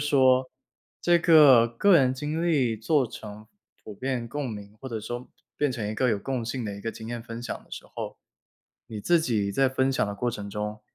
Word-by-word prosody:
说， 130 Hz, -3 st, +3 dB, 0.5 s
这 175 Hz, 0 st, +4 dB
个 145 Hz, -9 st, +7 dB
个 170 Hz, +12 st, +4 dB
人 130 Hz, -4 st, +3 dB
经 150 Hz, +5 st, -3 dB
历 135 Hz, -9 st, +2 dB
做 130 Hz, +5 st, +1 dB
成 105 Hz, -2 st, -10 dB, 0.4 s
普 105 Hz, -, -8 dB
遍 125 Hz, +1 st, -3 dB
共 140 Hz, +1 st, -4 dB
鸣， 105 Hz, -1 st, -9 dB
或 135 Hz, -, -7 dB
者 115 Hz, -3 st, -4 dB
说 120 Hz, +3 st, -6 dB, 0.3 s
变 145 Hz, -1 st, +1 dB
成 120 Hz, -4 st, -3 dB
一 105 Hz, -, -3 dB
个 125 Hz, +2 st, +1 dB
有 105 Hz, -, 0 dB
共 125 Hz, +2 st, -3 dB
性 120 Hz, +1 st, -3 dB
的 105 Hz, -2 st, -4 dB
一 100 Hz, -, -9 dB
个 115 Hz, -, -3 dB
经 110 Hz, 0 st, -10 dB
验 120 Hz, 0 st, -5 dB
分 115 Hz, -1 st, -7 dB
享 120 Hz, -, -4 dB
的 -, -, -28 dB
时 -, -, -7 dB
候， -, -, -5 dB, 0.7 s
你 110 Hz, -3 st, -6 dB
自 170 Hz, +9 st, +3 dB
己 110 Hz, -9 st, 0 dB
在 135 Hz, +5 st, +3 dB
分 130 Hz, +1 st, +1 dB
享 -, -, +1 dB
的 100 Hz, 0 st, -5 dB
过 120 Hz, +4 st, -1 dB
程 105 Hz, -4 st, -5 dB
中， 105 Hz, +1 st, -4 dB
120 Hz, 235 characters per minute, -26 LUFS, 110-135 Hz, 0.7 s, 个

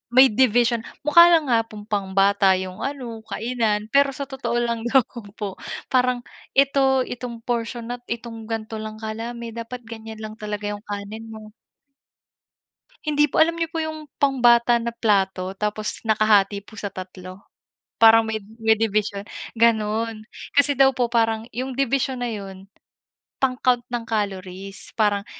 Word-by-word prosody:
may 260 Hz, +1 st, +8 dB
division, 240 Hz, 0 st, +3 dB, 0.2 s
mukha 340 Hz, +4 st, +8 dB
lang 320 Hz, -5 st, +3 dB
nga 225 Hz, -1 st, +3 dB
pong 210 Hz, -1 st, -10 dB
pang 195 Hz, -2 st, -2 dB
bata 195 Hz, -1 st, +4 dB
yung 185 Hz, 0 st, -5 dB
ano 255 Hz, -5 st, -5 dB
kainan 220 Hz, -2 st, -1 dB
pero 280 Hz, 0 st, +4 dB
sa 280 Hz, -, -4 dB
totoo 245 Hz, -3 st, -3 dB
lang 235 Hz, -1 st, -1 dB
lang 265 Hz, +1 st, +5 dB
naman 220 Hz, -4 st, -11 dB
po 200 Hz, -3 st, -5 dB, 0.3 s
parang 250 Hz, -1 st, +2 dB, 0.3 s
ito, 270 Hz, -1 st, +4 dB
itong 240 Hz, -1 st, -6 dB
portion 235 Hz, 0 st, -3 dB
nat 245 Hz, 0 st, -5 dB
itong 230 Hz, -1 st, -6 dB
ganito 220 Hz, 0 st, -4 dB
lang 215 Hz, 0 st, -6 dB
kadami 230 Hz, +2 st, -5 dB
dapat 235 Hz, +2 st, -7 dB
ganyan 220 Hz, -1 st, -9 dB
lang 215 Hz, 0 st, -7 dB
talaga 210 Hz, -1 st, -4 dB
yung 205 Hz, -, -9 dB
kanin 205 Hz, +2 st, -6 dB
mo. 215 Hz, -1 st, -10 dB, 1.5 s
Hindi 295 Hz, 0 st, +2 dB
po, -, -, -1 dB
alam 330 Hz, +1 st, +4 dB
nyo 330 Hz, -1 st, -1 dB
po 330 Hz, -, -4 dB
yung 310 Hz, -1 st, -6 dB
pambata 240 Hz, -3 st, +4 dB
na 235 Hz, 0 st, -2 dB
plato 195 Hz, -4 st, +1 dB
tapos 210 Hz, +1 st, -3 dB
nakahati 210 Hz, -2 st, +3 dB
po 220 Hz, -, -15 dB
sa 200 Hz, -1 st, -4 dB
3 185 Hz, 0 st, -9 dB, 0.5 s
parang 225 Hz, 0 st, +8 dB
may 220 Hz, -1 st, -2 dB, 0.2 s
may 220 Hz, -1 st, +4 dB
dibisyon 210 Hz, -2 st, -1 dB, 0.3 s
gano'n. 220 Hz, -1 st, +1 dB, 0.3 s
Kasi 285 Hz, -1 st, +3 dB
daw 270 Hz, -1 st, +5 dB
po 245 Hz, -2 st, 0 dB
parang 225 Hz, -2 st, +1 dB
'yong 255 Hz, +2 st, -4 dB
dibisyon 265 Hz, -1 st, 0 dB
na 240 Hz, -, -1 dB
'yon 195 Hz, -2 st, -8 dB, 0.7 s
pang-count 255 Hz, -2 st, +2 dB
ng 240 Hz, -1 st, -3 dB
calories 195 Hz, -3 st, -4 dB
parang 205 Hz, -2 st, +1 dB
225 Hz, 155 wpm, -23 LUFS, 210-250 Hz, 1.5 s, may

